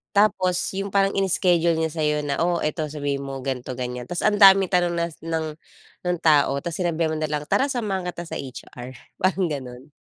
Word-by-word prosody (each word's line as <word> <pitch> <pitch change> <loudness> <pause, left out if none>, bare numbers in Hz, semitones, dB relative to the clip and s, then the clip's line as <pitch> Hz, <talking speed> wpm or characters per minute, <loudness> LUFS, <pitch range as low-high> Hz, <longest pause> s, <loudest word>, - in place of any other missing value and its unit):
tapos 185 -3 +3 0.2
'yung 195 +1 -3
parang 195 0 +4
ini-schedule 180 -3 +2
niya 160 0 -1
sa'yo 150 -2 0
na, 140 -1 -2
"Oh, 175 0 +1
ito, 155 0 -1
sabihin 145 -2 -3
mo 135 -1 -6
ganito, 130 -1 -4
ganiyan," 125 -1 -5
tas 175 - -3
ang 210 0 +2
daming 195 -2 +7
tanong 175 -2 +2
nas 170 -1 -3
ng 160 -1 -3 0.5
ng 180 -1 +1
tao, 145 -3 +4
tapos 170 0 -4
sinabihan 165 -2 0
mo 155 - -2
na 155 - -1
lang, 150 -1 -2
"Tara, 275 - +2
samahan 210 -9 -2
kita 175 -1 -5
sa - - -6
HR," 130 -1 -9 0.2
parang 185 0 +1
gano'n. 130 -1 -7
165 Hz, 195 wpm, -23 LUFS, 145-185 Hz, 0.5 s, daming